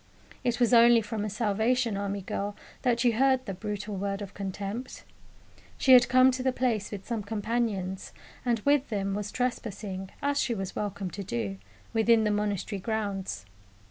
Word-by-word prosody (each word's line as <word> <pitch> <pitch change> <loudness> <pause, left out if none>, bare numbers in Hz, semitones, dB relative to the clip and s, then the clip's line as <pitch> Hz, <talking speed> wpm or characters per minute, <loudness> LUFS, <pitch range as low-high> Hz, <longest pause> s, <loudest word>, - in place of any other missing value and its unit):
It 245 -1 0
was 245 0 +3
only 235 -1 +7
from 210 0 -3
a 215 - -2
Salvation 220 +2 +1
Army 200 0 -3
girl 205 +2 -3 0.3
that 240 -2 +2
you 240 -2 +4
heard 260 +2 +3
the 195 - -4
brutal 210 +1 -4
word 200 +1 -2
of 200 - -9
contempt. 200 +5 -5 0.7
She 260 - +5
had 250 0 +7
come 255 0 +6
to 255 0 -3
the 260 0 +2
place 240 -5 0
with 200 -2 -7
some 235 -3 -2
companions, 205 -3 -2 0.3
and 240 -2 +2
with 285 +1 +2
them 195 -3 -1
was 210 +1 -3
trespassing, 210 -6 -3
as 285 0 0
she 235 - 0
was 195 -2 -5
welcome 200 -3 -3
to 200 - -5
do, 105 - -3 0.3
within 225 0 +4
the 210 - +2
monastery 205 -1 -1
grounds. 195 - -3
210 Hz, 175 wpm, -28 LUFS, 200-240 Hz, 0.7 s, only